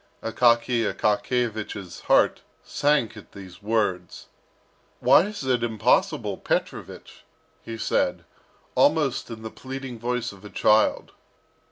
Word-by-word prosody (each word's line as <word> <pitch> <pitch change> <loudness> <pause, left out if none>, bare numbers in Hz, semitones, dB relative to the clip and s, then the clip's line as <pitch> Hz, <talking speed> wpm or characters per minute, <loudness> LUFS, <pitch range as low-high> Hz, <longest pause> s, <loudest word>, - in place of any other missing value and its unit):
Akaky 115 +1 +2
Akakiyevich's 105 -4 -2
heart - - +4 0.2
sank 145 -7 +1
at 105 - -14
these 95 -1 -12
words. 100 -5 -2 0.7
"Why 175 - +5
is 210 -9 -6
it 125 -2 +1
impossible, 115 -3 +1
Petrovich?" - - -4 0.4
he 115 -1 -7
said, - - 0 0.5
almost - - +2
in 110 -1 -8
the 110 - -6
pleading 130 -2 -7
voice 120 0 -2
of 100 -2 -16
a 105 - -9
child. 110 +1 +2
115 Hz, 115 wpm, -25 LUFS, 105-125 Hz, 0.7 s, Why